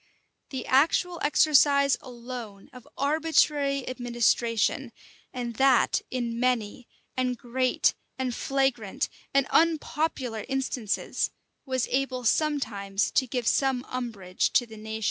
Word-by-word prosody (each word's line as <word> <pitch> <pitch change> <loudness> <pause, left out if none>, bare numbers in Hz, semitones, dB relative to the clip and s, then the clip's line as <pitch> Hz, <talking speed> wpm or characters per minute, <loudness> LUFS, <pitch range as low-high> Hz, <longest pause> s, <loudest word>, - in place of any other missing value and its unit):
The 265 -3 -5
actual 330 +6 +2
exercise 285 -2 +4
alone 240 -3 -9
of 250 -2 -13
arbitrary 290 -2 +1
administration, 240 -2 0 0.4
and 240 -2 -4
that 265 -2 +4
in 235 -2 -3
many, 245 -2 -1 0.3
and 255 -1 0
great, 255 +2 +1 0.2
and 260 -2 -2
flagrant, 270 -3 -1 0.2
and 275 -1 +3
unpopular 300 -8 +1
instances, 265 -5 -1 0.4
was 260 -2 0
able 260 -1 -1
sometimes 220 -8 0
to 265 -5 +2
give 245 -1 -3
some 265 0 +1
umbrage 220 -8 -2
to 245 - +4
the 220 -1 -12
nation. 220 +1 -6
255 Hz, 110 wpm, -27 LUFS, 235-275 Hz, 0.4 s, exercise